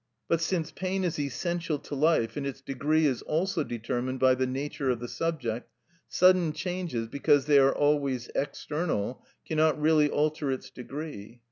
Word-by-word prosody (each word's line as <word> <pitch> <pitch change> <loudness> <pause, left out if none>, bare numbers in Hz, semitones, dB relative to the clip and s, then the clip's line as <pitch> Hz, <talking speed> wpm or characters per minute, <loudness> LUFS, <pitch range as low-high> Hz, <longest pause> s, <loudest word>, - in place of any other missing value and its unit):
But 165 -1 +1
since 165 -1 -1
pain 190 0 -2
is 170 -4 -1
essential 165 +2 -2
to 145 - -10
life, 145 -5 +2
and 145 - -3
its 140 -1 -4
degree 140 +4 +1
is 130 -5 +1
also 170 +1 0
determined 120 +2 -3
by 130 0 +5
the 130 0 0
nature 135 +1 -2
of 125 -2 +1
the 120 - -5
subject, 125 -7 -3 0.4
sudden 180 -3 +4
changes, 170 -8 -3
because 140 +2 +2
they 145 -1 +6
are 135 0 +4
always 140 -4 +1
external, 145 - -2 0.2
cannot 155 -1 +2
really 150 -1 +4
alter 150 -1 0
its 130 - -5
degree. 125 -4 -8
145 Hz, 160 wpm, -28 LUFS, 130-160 Hz, 0.4 s, they